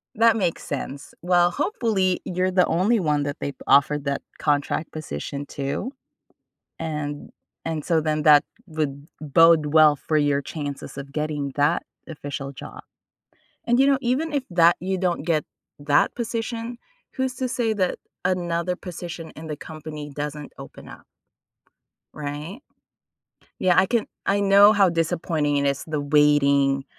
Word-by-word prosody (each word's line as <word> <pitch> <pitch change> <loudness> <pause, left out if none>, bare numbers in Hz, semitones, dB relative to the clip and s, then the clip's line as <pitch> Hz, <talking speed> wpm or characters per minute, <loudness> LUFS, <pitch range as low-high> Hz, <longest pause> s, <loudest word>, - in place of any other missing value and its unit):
that 225 0 +4
makes 180 -5 -1
sense. 140 0 -6
Well, 175 0 +3
hopefully 200 - 0
you're 185 +1 -1
the 180 -1 +4
only 200 +7 +2
1 150 -3 +1
that 145 0 -3
they've 140 - -3
offered 145 +1 +4
that 140 0 -1 0.2
contract 145 +1 0
position 140 - -5
to, 140 - -2 0.9
and 150 -2 -4 0.3
and 160 -2 -3
so 165 -3 +2
then 155 -1 -1
that 150 -1 +7 0.2
would 150 -2 -4
bode 155 +1 +5
well 155 -2 +7
for 155 +2 -1
your 145 -1 +2
chances 145 -1 -6
of 140 0 -7
getting 150 -3 -2
that 145 +4 +2 0.3
official 140 -2 -6
job, 130 - -10 0.8
and 240 +2 +2
you 270 - +5
know, 275 - +4
even 280 +6 -1
if 280 -2 0
that 170 -1 +5
you 190 +1 -1
don't 175 -5 -1
get 160 -3 0 0.3
that 145 0 +2
position, 230 0 -4 0.4
who's 260 -1 -2
to 255 +1 -2
say 240 -3 0
that 185 -3 0 0.3
another 175 -1 0
position 175 -2 -8
in 160 +1 -8
the 150 - -4
company 150 0 -8
doesn't 150 0 -5
open - - -11
up? - - -12 1.1
Right? 150 - -6 1.0
Yeah, 180 -1 +2
I 190 - +6
can 235 0 +1 0.2
I 200 +1 +2
know 200 +1 +7
how 200 -3 +4
disappointing 160 -3 0
it 140 - +1
is, 140 0 -1
the 155 -1 -2
waiting, 140 -2 +3
160 Hz, 150 wpm, -23 LUFS, 145-185 Hz, 1.1 s, that